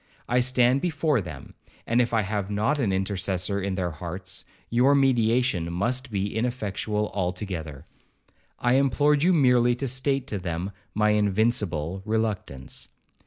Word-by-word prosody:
I 125 Hz, +1 st, +2 dB
stand 125 Hz, +1 st, +3 dB
before 155 Hz, -7 st, +1 dB
them, 80 Hz, -7 st, -9 dB, 0.3 s
and 120 Hz, +2 st, +3 dB
if 120 Hz, -, 0 dB
I 110 Hz, -2 st, +2 dB
have 100 Hz, 0 st, -2 dB
not 110 Hz, +9 st, 0 dB
an 110 Hz, -8 st, +1 dB
intercessor 95 Hz, 0 st, -1 dB
in 95 Hz, 0 st, -2 dB
their 90 Hz, -2 st, -1 dB
hearts, 90 Hz, +4 st, -5 dB, 0.2 s
your 125 Hz, +4 st, +4 dB
mediation 120 Hz, -8 st, +2 dB
must 120 Hz, +9 st, -1 dB
be 100 Hz, -1 st, -2 dB
ineffectual 105 Hz, -3 st, -2 dB
altogether. 90 Hz, -6 st, -4 dB, 0.7 s
I 120 Hz, +2 st, +2 dB
implored 140 Hz, +2 st, +3 dB
you 180 Hz, +4 st, +4 dB
merely 125 Hz, -6 st, +4 dB
to 135 Hz, +2 st, -3 dB
state 135 Hz, +1 st, 0 dB
to 105 Hz, -, -2 dB
them 90 Hz, +1 st, -3 dB, 0.2 s
my 105 Hz, 0 st, +3 dB
invincible 100 Hz, -5 st, +1 dB
reluctance.' 105 Hz, -11 st, -2 dB
105 Hz, 140 wpm, -26 LUFS, 95-125 Hz, 0.7 s, your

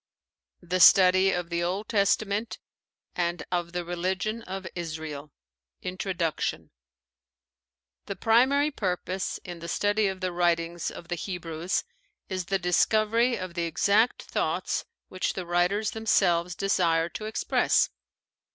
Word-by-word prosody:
THE 180 Hz, +1 st, -1 dB
STUDY 185 Hz, +1 st, +7 dB
OF 180 Hz, -2 st, -2 dB
THE 170 Hz, 0 st, 0 dB
OLD 190 Hz, +5 st, -2 dB
TESTAMENT 205 Hz, +1 st, +1 dB, 0.6 s
AND 175 Hz, 0 st, -1 dB
OF 175 Hz, -1 st, -1 dB
THE 175 Hz, 0 st, -3 dB
RELIGION 185 Hz, +6 st, -2 dB
OF 190 Hz, -3 st, -6 dB
ISRAEL 155 Hz, -4 st, -6 dB, 0.5 s
INTRODUCTION 180 Hz, -3 st, -2 dB, 1.4 s
The 200 Hz, -, -4 dB
primary 260 Hz, +8 st, +3 dB
purpose 185 Hz, -, -3 dB
in 175 Hz, -1 st, -8 dB
the 170 Hz, -, -7 dB
study 205 Hz, +4 st, +1 dB
of 190 Hz, -1 st, -3 dB
the 185 Hz, -1 st, -2 dB
writings 170 Hz, -1 st, 0 dB
of 170 Hz, -, -10 dB
the -, -, -1 dB
Hebrews 175 Hz, -1 st, -3 dB, 0.5 s
is 185 Hz, -2 st, -3 dB
the 195 Hz, +2 st, 0 dB
discovery 215 Hz, +6 st, +2 dB
of 185 Hz, -2 st, -6 dB
the 170 Hz, -1 st, -1 dB
exact 205 Hz, +7 st, +2 dB
thoughts -, -, -2 dB, 0.2 s
which 185 Hz, -, -2 dB
the 185 Hz, -, -5 dB
writers 175 Hz, +5 st, +1 dB
themselves 175 Hz, -6 st, +1 dB
desired 170 Hz, -4 st, +1 dB
to 215 Hz, -, -5 dB
express. 215 Hz, -, +1 dB
185 Hz, 125 wpm, -27 LUFS, 175-200 Hz, 1.4 s, STUDY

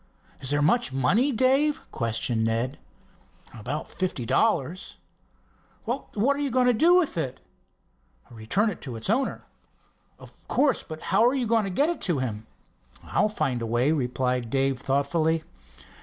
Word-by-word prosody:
"Is 130 Hz, -, -4 dB
there 145 Hz, 0 st, +1 dB
much 235 Hz, -, +2 dB
money, 195 Hz, -, +2 dB
Dave?" 270 Hz, +5 st, +2 dB
questioned 115 Hz, 0 st, -1 dB
Ned. 115 Hz, +5 st, -1 dB, 0.7 s
"About 125 Hz, +7 st, -5 dB
fifty 180 Hz, -10 st, -3 dB
dollars." 160 Hz, +9 st, 0 dB, 0.9 s
"What 245 Hz, +1 st, -1 dB
are -, -, -5 dB
you 285 Hz, -1 st, 0 dB
going 255 Hz, 0 st, +2 dB
to 250 Hz, -, +4 dB
do 330 Hz, +10 st, +5 dB
with 330 Hz, -, +2 dB
it?" 130 Hz, -5 st, -3 dB, 0.9 s
"Return 120 Hz, -, 0 dB
it -, -, -10 dB
to 120 Hz, -5 st, -6 dB
the 190 Hz, -, +1 dB
owner." 265 Hz, +3 st, -2 dB, 0.7 s
"Of -, -, -14 dB
course, 280 Hz, -4 st, +2 dB
but 155 Hz, -1 st, -9 dB
how -, -, +5 dB
are 250 Hz, +3 st, +3 dB
you 255 Hz, -3 st, 0 dB
going 225 Hz, -1 st, +2 dB
to -, -, -3 dB
get 275 Hz, +11 st, +2 dB
it 345 Hz, -, -3 dB
to 175 Hz, -5 st, 0 dB
him?" 110 Hz, -4 st, -4 dB, 0.6 s
"I'll 215 Hz, -, +1 dB
find 135 Hz, -, -1 dB
a 115 Hz, -, -3 dB
way," 120 Hz, +6 st, +2 dB
replied 125 Hz, -4 st, -1 dB
Dave 135 Hz, 0 st, 0 dB
thoughtfully. 155 Hz, +4 st, 0 dB
155 Hz, 155 wpm, -26 LUFS, -, 0.9 s, do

